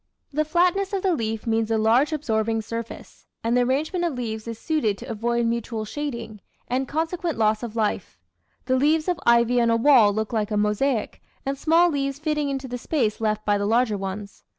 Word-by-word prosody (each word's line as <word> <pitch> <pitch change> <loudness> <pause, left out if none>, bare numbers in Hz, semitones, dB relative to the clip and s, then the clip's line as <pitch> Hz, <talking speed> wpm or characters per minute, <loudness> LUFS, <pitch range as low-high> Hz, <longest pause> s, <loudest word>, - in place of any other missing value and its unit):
The 305 +2 +2
flatness 360 +5 +1
of 390 - -1
the 380 -2 +2
leaf 225 -6 -3
means 225 -1 0
a 225 - +2
large 230 +8 +3
absorbing 225 -7 -1
surface, 230 +1 -8 0.2
and 230 +1 +1
the 250 - +4
arrangement 295 +8 0
of 335 -5 -1
leaves 220 -2 -4
is 230 -1 -5
suited 230 -9 0
to - - -9
avoid 235 +1 -1
mutual 230 -1 -2
shading, 235 -5 -5 0.3
and 260 +2 -1
consequent 325 +1 -2
loss 215 -1 +2
of 235 -2 -6
light. 210 - -2 0.5
The 260 0 +2
leaves 310 +4 +2
of 360 -2 0
ivy 235 +1 +4
on 235 - +2
a 230 - +3
wall 235 -4 +6
look 220 +2 -3
like 215 -2 0
a 210 - -1
mosaic, 210 +4 0 0.3
small 330 +5 +3
leaves 275 -2 -2
fitting 300 -1 -1
into 270 -1 -3
the 245 0 -5
space 235 -7 -1
left 215 -1 -1
by 205 -1 +2
the 200 - -1
larger 230 0 +2
ones. 195 +1 -6
235 Hz, 195 wpm, -24 LUFS, 220-295 Hz, 0.5 s, wall